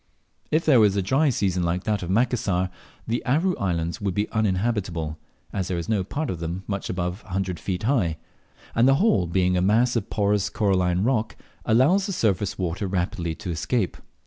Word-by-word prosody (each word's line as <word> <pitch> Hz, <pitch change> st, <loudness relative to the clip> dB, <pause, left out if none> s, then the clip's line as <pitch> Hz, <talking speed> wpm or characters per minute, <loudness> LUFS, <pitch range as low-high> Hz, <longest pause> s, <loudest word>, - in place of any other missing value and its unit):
If 155 Hz, +2 st, +1 dB
there 135 Hz, -6 st, +6 dB
were 105 Hz, -, +7 dB
a 100 Hz, 0 st, 0 dB
dry 135 Hz, +10 st, +2 dB
season 95 Hz, -7 st, 0 dB
like 85 Hz, +2 st, -1 dB
that 105 Hz, -2 st, 0 dB
of 90 Hz, -, -5 dB
Macassar, 100 Hz, -4 st, +1 dB, 0.3 s
the 115 Hz, +1 st, -2 dB
Aru 165 Hz, +8 st, +1 dB
Islands 85 Hz, -2 st, -2 dB
would 100 Hz, -3 st, -1 dB
be 105 Hz, +1 st, 0 dB
uninhabitable, 95 Hz, -7 st, -1 dB, 0.3 s
as 95 Hz, -2 st, -2 dB
there 90 Hz, -, -2 dB
is 85 Hz, -, -4 dB
no 105 Hz, -4 st, +1 dB
part 145 Hz, +11 st, -3 dB
of 90 Hz, -, -5 dB
them 85 Hz, +3 st, -4 dB
much 100 Hz, -1 st, -4 dB
above 90 Hz, +2 st, -3 dB
a 95 Hz, -, -9 dB
hundred 95 Hz, -2 st, -2 dB
feet 95 Hz, 0 st, -3 dB
high; 105 Hz, -, +1 dB, 0.6 s
and 115 Hz, +3 st, +4 dB
the 135 Hz, -, +6 dB
whole 125 Hz, -, +3 dB
being 90 Hz, +1 st, +1 dB
a 90 Hz, -, +2 dB
mass 115 Hz, +6 st, +3 dB
of 110 Hz, -2 st, -1 dB
porous 100 Hz, -1 st, +1 dB
coralline 95 Hz, -3 st, +1 dB
rock, 115 Hz, -2 st, 0 dB, 0.3 s
allows 150 Hz, -, +4 dB
the 195 Hz, -, -2 dB
surface 105 Hz, -, 0 dB
water 90 Hz, +2 st, -2 dB
rapidly 90 Hz, -3 st, -2 dB
to 95 Hz, -2 st, -5 dB
escape. 90 Hz, -, -1 dB
100 Hz, 195 wpm, -24 LUFS, 90-115 Hz, 0.6 s, were